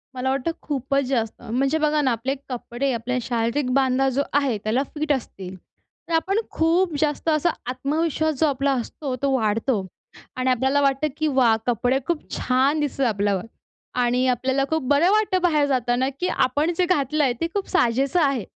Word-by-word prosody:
मला 255 Hz, +1 st, -1 dB
वाटतं 270 Hz, +4 st, 0 dB
खूपच 275 Hz, -1 st, -1 dB
जास्त, 230 Hz, -5 st, -2 dB
म्हणजे 270 Hz, +6 st, 0 dB
बघा 305 Hz, 0 st, +2 dB
ना 265 Hz, -3 st, +2 dB
आपले 250 Hz, +4 st, -2 dB
कपडे 250 Hz, +2 st, -3 dB
आपल्या 245 Hz, +2 st, -2 dB
शारीरिक 240 Hz, +3 st, -1 dB
बांधा 270 Hz, 0 st, +2 dB
जो 280 Hz, -, +2 dB
आहे 275 Hz, -5 st, +2 dB
त्याला 230 Hz, +5 st, +1 dB
फिट 305 Hz, 0 st, -1 dB
असतील. 190 Hz, -8 st, -6 dB, 0.5 s
तर 335 Hz, -, -4 dB
आपण 380 Hz, +5 st, +1 dB
खूप 335 Hz, +2 st, +2 dB
जास्त 300 Hz, +1 st, 0 dB
असा 310 Hz, +2 st, +2 dB, 0.2 s
आत्मविश्वास 305 Hz, +3 st, -1 dB
जो -, -, +4 dB
आपला 275 Hz, 0 st, 0 dB
असतो 265 Hz, +3 st, -5 dB
तो 280 Hz, -1 st, +1 dB
वाढतो 220 Hz, -2 st, 0 dB, 0.5 s
आणि 255 Hz, 0 st, 0 dB
आपल्याला 265 Hz, +3 st, +2 dB
वाटतं, 275 Hz, +2 st, +2 dB
की 310 Hz, -, 0 dB
वाह! 260 Hz, -6 st, +4 dB
कपडे 245 Hz, +3 st, +1 dB
खूप 340 Hz, -3 st, -2 dB
छान 265 Hz, +4 st, +2 dB
दिसतं 280 Hz, -2 st, -1 dB
आपल्यावर 200 Hz, -3 st, 0 dB, 0.6 s
आणि 245 Hz, +1 st, +2 dB
आपल्याला 260 Hz, +2 st, +1 dB
खूप 320 Hz, 0 st, 0 dB
बरं 300 Hz, +6 st, +4 dB
वाटतं 415 Hz, -3 st, +2 dB
बाहेर 310 Hz, -5 st, +3 dB
जाताना, 255 Hz, 0 st, +1 dB
की 360 Hz, -, 0 dB
आपण 290 Hz, +5 st, +1 dB
जे 365 Hz, -, +3 dB
घातलं 300 Hz, -4 st, +1 dB
आहे 260 Hz, -3 st, +2 dB
ते 330 Hz, -, +1 dB
खूप 400 Hz, -1 st, -2 dB
साजेसं 270 Hz, -, +2 dB
आहे. 275 Hz, -, +1 dB
270 Hz, 175 wpm, -23 LUFS, 250-305 Hz, 0.6 s, जो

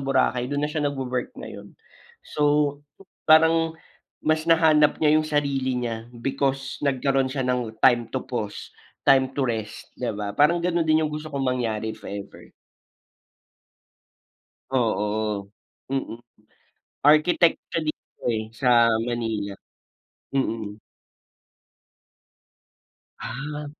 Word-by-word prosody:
Boracay, 130 Hz, -2 st, +1 dB
do'n 145 Hz, +1 st, -1 dB
na -, -, -1 dB
siya 155 Hz, -, -2 dB
nagwo-work 130 Hz, -3 st, -4 dB
ngayon. 100 Hz, 0 st, -10 dB, 0.5 s
So, 145 Hz, -1 st, +1 dB, 0.5 s
parang 160 Hz, +1 st, +5 dB, 0.5 s
mas 155 Hz, +1 st, +1 dB
nahanap 155 Hz, -2 st, +5 dB
niya 150 Hz, -1 st, +3 dB
'yong 155 Hz, 0 st, -2 dB
sarili 140 Hz, -3 st, 0 dB
niya, 115 Hz, -1 st, -4 dB
because, 135 Hz, +1 st, -2 dB
nagkaroon 135 Hz, -1 st, +1 dB
siya 135 Hz, 0 st, -2 dB
ng 125 Hz, -3 st, -1 dB
time 120 Hz, -3 st, +5 dB
to 130 Hz, -, -4 dB
pause, 105 Hz, -4 st, -5 dB, 0.3 s
time 130 Hz, -1 st, +5 dB
to 140 Hz, -, +1 dB
rest, 110 Hz, -3 st, -4 dB
'di 125 Hz, -2 st, -2 dB
ba, 105 Hz, -1 st, -3 dB
parang 150 Hz, +10 st, +4 dB
gano'n 170 Hz, -2 st, +1 dB
din 155 Hz, 0 st, +4 dB
'yong 150 Hz, -, -3 dB
gusto 155 Hz, +1 st, -5 dB
kong 140 Hz, -2 st, -3 dB
mangyari, 110 Hz, -3 st, -2 dB
if -, -, -13 dB
ever. 100 Hz, -1 st, -8 dB, 2.2 s
Oo, 105 Hz, -5 st, -1 dB, 0.4 s
mm, 135 Hz, -4 st, -3 dB, 0.9 s
architect 165 Hz, +3 st, +5 dB
siya 165 Hz, -, 0 dB
dito 155 Hz, -, -7 dB
eh, 110 Hz, -1 st, -2 dB
sa 120 Hz, -3 st, +5 dB
Manila. 115 Hz, -4 st, -2 dB, 0.8 s
Mm. 110 Hz, -6 st, -2 dB, 2.4 s
Ah, 150 Hz, +4 st, -6 dB
130 Hz, 115 wpm, -24 LUFS, 115-150 Hz, 2.4 s, parang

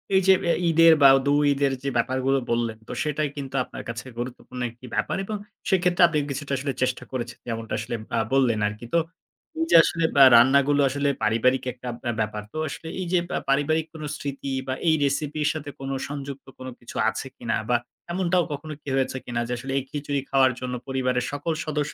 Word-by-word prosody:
এই 190 Hz, -, +6 dB
যে 190 Hz, -, +9 dB
এ্যা 170 Hz, -, +3 dB
ঈদের 165 Hz, 0 st, +7 dB
বা 140 Hz, -, +9 dB, 0.2 s
দু 140 Hz, -, +3 dB, 0.2 s
ঈদের 140 Hz, -1 st, +1 dB
যে 140 Hz, -, 0 dB
ব্যাপারগুলো 130 Hz, +3 st, +1 dB
বললেন। 115 Hz, -2 st, 0 dB
তো -, -, -6 dB
সেটাই 150 Hz, 0 st, -1 dB
কিন্তু 135 Hz, -1 st, -6 dB
আপনার 130 Hz, -, -9 dB
কাছে 115 Hz, +1 st, -5 dB
গুরুত্বপূর্ণ 125 Hz, +1 st, -6 dB
একটি 120 Hz, +2 st, -15 dB
ব্যাপার -, -, 0 dB
এবং 215 Hz, -, -4 dB, 0.3 s
সেক্ষেত্রে 180 Hz, -2 st, +2 dB
আপনি 160 Hz, -2 st, -1 dB
কিছুটা 140 Hz, +1 st, -4 dB
আসলে 140 Hz, +1 st, -2 dB
চেষ্টা 130 Hz, -1 st, 0 dB
করেছেন 120 Hz, -2 st, -4 dB
যেমনটা 115 Hz, -1 st, -4 dB
আসলে 110 Hz, +2 st, -4 dB, 0.2 s
আ -, -, +3 dB
বললেন 125 Hz, -5 st, +3 dB
আরকি। 105 Hz, +3 st, -7 dB
তো 170 Hz, -, +5 dB, 0.6 s
এই 325 Hz, -, +2 dB
যে -, -, +5 dB
আসলে 165 Hz, 0 st, 0 dB
বা 140 Hz, -, +8 dB
রান্নাগুলো 140 Hz, +4 st, +5 dB
আসলে 140 Hz, +1 st, 0 dB
পারিবারিক 125 Hz, +4 st, +2 dB
একটা 125 Hz, 0 st, -10 dB, 0.2 s
আ -, -, +2 dB
ব্যাপার। 105 Hz, -1 st, -2 dB
তো -, -, -6 dB
আসলে 160 Hz, -, -8 dB
এই 185 Hz, -, -2 dB
যে 180 Hz, -, +5 dB
পা -, -, -1 dB
পারিবারিক 150 Hz, +3 st, +2 dB
কোনো 155 Hz, -1 st, -7 dB
স্মৃতি 140 Hz, -1 st, -5 dB, 0.2 s
বা 130 Hz, -, -1 dB
এই 160 Hz, -, +6 dB
recipe 145 Hz, +2 st, -1 dB
র -, -, +2 dB
সাথে 155 Hz, -2 st, -6 dB
কোনো 135 Hz, 0 st, -4 dB, 0.2 s
সংযুক্ত 140 Hz, -1 st, -6 dB
কোনো 130 Hz, 0 st, -6 dB
কিছু 120 Hz, -, -12 dB
আছে 110 Hz, +4 st, -5 dB
কিনা? 115 Hz, -, -1 dB
বা 125 Hz, -, +4 dB, 0.4 s
এমনটাও 180 Hz, 0 st, +2 dB
কখনো 155 Hz, +2 st, -6 dB
কি -, -, -22 dB
হয়েছে 135 Hz, 0 st, 0 dB
কিনা 120 Hz, -1 st, -2 dB
যে 125 Hz, -, -2 dB
আসলে 135 Hz, +3 st, -6 dB
এই 135 Hz, -, 0 dB
খিচুড়ি 145 Hz, -1 st, -2 dB
খাওয়ার 135 Hz, -1 st, +4 dB
জন্য 125 Hz, 0 st, -4 dB
পরিবারের 130 Hz, -2 st, 0 dB
সকল 145 Hz, +3 st, -2 dB
সদস্য 150 Hz, -1 st, -2 dB
135 Hz, 205 wpm, -25 LUFS, 125-150 Hz, 0.6 s, যে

